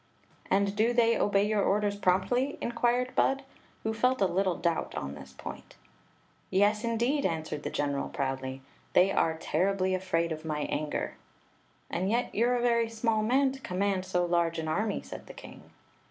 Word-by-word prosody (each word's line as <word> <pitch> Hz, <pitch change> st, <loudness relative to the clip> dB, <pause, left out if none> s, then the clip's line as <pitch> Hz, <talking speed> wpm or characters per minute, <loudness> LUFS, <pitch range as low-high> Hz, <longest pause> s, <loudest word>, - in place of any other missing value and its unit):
"And 200 Hz, +1 st, +3 dB
dp 220 Hz, +4 st, +1 dB
they 230 Hz, -1 st, +4 dB
obey 200 Hz, 0 st, +2 dB
your 210 Hz, -1 st, +1 dB
orders 205 Hz, +1 st, +1 dB
promptly?" 205 Hz, +8 st, +1 dB
in -, -, -2 dB
quired 245 Hz, +1 st, +1 dB
Bud, 270 Hz, +1 st, +2 dB, 0.4 s
who 220 Hz, -, -1 dB
felt 250 Hz, +3 st, +2 dB
a 195 Hz, -, +4 dB
little 185 Hz, 0 st, +1 dB
doubt 170 Hz, -1 st, -1 dB
on 70 Hz, 0 st, -4 dB
this 75 Hz, -, -11 dB
point -, -, -9 dB, 0.7 s
"Yes, 205 Hz, +3 st, +3 dB
indeed!" 240 Hz, +5 st, +1 dB
answered 160 Hz, -3 st, -2 dB
the -, -, -3 dB
general, 140 Hz, -1 st, -1 dB
proudly. 135 Hz, -1 st, -3 dB, 0.3 s
"They 185 Hz, +2 st, +5 dB
are 160 Hz, -4 st, +1 dB
terribly 185 Hz, +4 st, 0 dB
afraid 175 Hz, -3 st, 0 dB
of 155 Hz, 0 st, -4 dB
my 155 Hz, -2 st, -2 dB
anger." 150 Hz, +1 st, -2 dB, 0.4 s
" -, -, -37 dB
And 185 Hz, +3 st, -1 dB
yet 240 Hz, +3 st, 0 dB
you 235 Hz, +3 st, +2 dB
re 250 Hz, -, +2 dB
a -, -, -1 dB
very 235 Hz, -1 st, +2 dB
small 225 Hz, -1 st, 0 dB
man 260 Hz, +5 st, +3 dB
to 270 Hz, -, -9 dB
ccmimand 195 Hz, -3 st, -1 dB
so 180 Hz, -1 st, +1 dB
large 170 Hz, -1 st, +1 dB
an 160 Hz, -1 st, -3 dB
army," 205 Hz, +6 st, -1 dB
said -, -, -9 dB
the -, -, -9 dB
king. -, -, -12 dB
195 Hz, 185 wpm, -29 LUFS, 170-230 Hz, 0.7 s, They